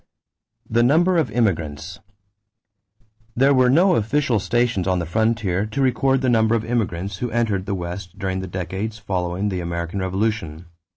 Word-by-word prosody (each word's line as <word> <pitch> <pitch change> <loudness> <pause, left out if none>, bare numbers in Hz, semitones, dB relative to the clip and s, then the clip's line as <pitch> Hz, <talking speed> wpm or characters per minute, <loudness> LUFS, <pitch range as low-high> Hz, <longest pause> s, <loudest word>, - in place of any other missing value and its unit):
=The 115 +1 +2
Number 170 +9 +3
of 155 - 0
Immigrants.= 85 - -2 1.4
There 135 +3 +4
were 130 -1 +4
no 175 +8 +4
official 120 0 +1
stations 120 -3 0
on 95 -1 +2
the 85 - -2
frontier 105 +1 0
to 110 +6 -5
record 135 0 +2
the 130 - 0
number 115 -2 +3
of 110 -1 -1
immigrants 100 -5 -2
who 125 +5 -3
entered 110 -5 -1
the 100 - -1
West 90 +1 -6
during 95 -1 -2
the 95 - -5
decades 95 +4 -4
following 95 -2 -2
the 90 -2 -3
American 85 +2 -4
Revolution. 95 -4 -2
105 Hz, 160 wpm, -22 LUFS, 90-120 Hz, 1.4 s, There